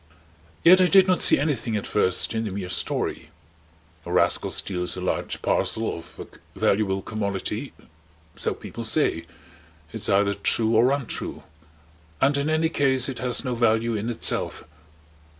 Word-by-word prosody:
Yet 185 +2 +7
I 180 - +5
did 190 0 +6
not 185 -1 +1
see - - +7
anything 130 -6 -1
at 105 - -5
first 95 +1 +1
in 110 0 -2
the - - -3
mere 95 -1 -5
story. 90 - -2 0.7
A - - -8
rascal - - +2
steals 90 -2 -2
a - - -4
large 90 - -3
parcel 110 0 -1
of 85 - -12 0.4
a - - -12
valuable 95 -2 +1
commodity 100 -3 -4 0.6
so - - -2
people - - -8
say. - - 0 0.7
It's - - -3
either 100 +1 +2
true 110 +3 0
or 120 +4 +4
untrue; 140 -4 -3 0.8
and 140 +2 +3
in 140 +2 -1
any 160 +1 +1
case 135 -4 +2
it 125 -3 -6
has 125 +2 -1
no 125 - -1
value 115 -1 +1
in 110 +2 -3
itself. 120 - 0
115 Hz, 155 wpm, -24 LUFS, 100-135 Hz, 0.8 s, Yet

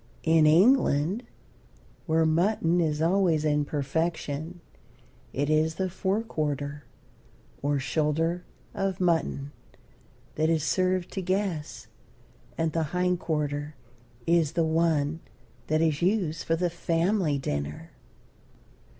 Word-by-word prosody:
In 160 -1 +4
England, 180 - +4 0.9
where 160 0 +3
mutton 170 +1 +2
is 155 -1 0
always 170 -3 +2
in 150 -1 +2
perfection, 160 +3 -2 0.7
it 145 +2 -1
is 155 +1 +2
the 190 0 -2
fore 190 +4 -1
quarter 145 - -3 0.8
or 145 +1 +1
shoulder 160 +5 0 0.3
of 195 -1 -2
mutton 165 -5 0 0.9
that 155 +1 +2
is 160 -2 +1
served 185 +2 0
to 190 - -3
guests, 185 -4 -2 0.7
and 165 -1 0
the 165 - 0 0.2
hind 180 -1 +1
quarter 150 -2 -2 0.5
is 165 -3 +2
the 165 -1 +2
one 160 -1 +1 0.5
that 155 +1 +1
is 155 -3 +1
used 175 -4 0
for 165 - +2
the 175 +1 -1
family 170 -1 +1
dinner. 75 - -4
160 Hz, 115 wpm, -27 LUFS, 150-175 Hz, 0.9 s, In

